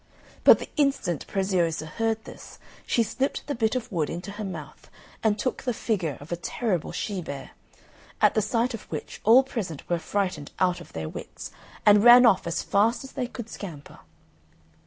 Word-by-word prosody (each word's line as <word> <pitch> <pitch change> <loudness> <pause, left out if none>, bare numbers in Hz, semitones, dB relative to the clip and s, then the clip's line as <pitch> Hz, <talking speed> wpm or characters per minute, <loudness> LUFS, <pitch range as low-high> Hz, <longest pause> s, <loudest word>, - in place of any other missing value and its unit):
But - - +9
the - - -8
instant 275 - 0
Preziosa 180 -5 0
heard 225 +6 -2
this, - - -11 0.3
she 235 - +3
slipped 265 +6 -2
the 290 - -2
bit 225 -2 0
of 250 -1 -3
wood 165 -5 -1
into 175 +4 -5
her 210 +1 -6
mouth, 190 -2 -8 0.3
and 215 -2 +2
took 255 +4 -2
the 250 -3 -2
figure 180 - -1
of 145 +4 -12
a - - +1
terrible 180 0 -2
she 200 -4 -3
bear, 140 -4 -7 0.7
at - - +5
the 215 - +2
sight 230 +4 0
of 230 - -8
which - - -6
all 240 +5 +7
present 200 - -5
were 175 -1 0
frightened 180 -6 -2
out 180 -1 +1
of - - -14
their 80 -1 -4
wits, - - -8 0.3
and 210 -1 +7
ran 245 +1 +9
off 200 -7 +4
as 170 - -1
fast 215 +6 +2
as 270 - -10
they 255 -3 -3
could 235 -2 -8
scamper. 170 -10 -9
205 Hz, 185 wpm, -26 LUFS, 175-235 Hz, 0.7 s, But